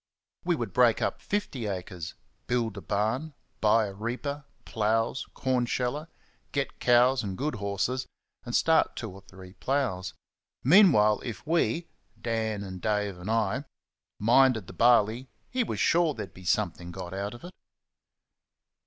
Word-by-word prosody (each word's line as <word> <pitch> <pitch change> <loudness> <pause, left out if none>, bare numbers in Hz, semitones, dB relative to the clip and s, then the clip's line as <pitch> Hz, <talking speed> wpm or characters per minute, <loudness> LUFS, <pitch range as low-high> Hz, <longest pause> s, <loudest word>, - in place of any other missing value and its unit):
We - - +1
would - - -4
break - - +4
up - - -2
fifty 140 - -2
acres, 90 -3 -5 0.3
build 115 -4 0
a 100 - -7
barn, 115 +11 -1 0.2
buy 110 +1 +4
a 100 - -6
reaper, 130 +7 -4 0.2
ploughs, 115 +3 0
cornsheller, 130 +3 -1 0.4
get 140 -1 -2
cows 125 +1 +4
and 95 -3 -4
good 150 +3 -1
horses, 100 +6 -1 0.4
and 120 - -4
start 160 0 +3
two 110 -4 -5
or 95 +1 -12
three 95 -1 -13
ploughs. 110 -9 -1 0.5
Meanwhile, 135 - +6
if 120 +1 -6
we 165 +1 +1 0.3
(Dan, 110 -5 -3
Dave 105 -1 -1
and 90 +4 -6
I) 115 +4 0 0.5
minded 120 -1 +4
the 95 - -11
barley 120 +4 +3 0.2
he 255 -1 +1
was - - -4
sure 165 -3 +3
there'd - - -7
be 90 - -13
something 90 -4 0
got 90 -1 -7
out 100 +3 -3
of 120 - -14
it. 175 - -8
115 Hz, 145 wpm, -28 LUFS, 100-130 Hz, 0.5 s, Meanwhile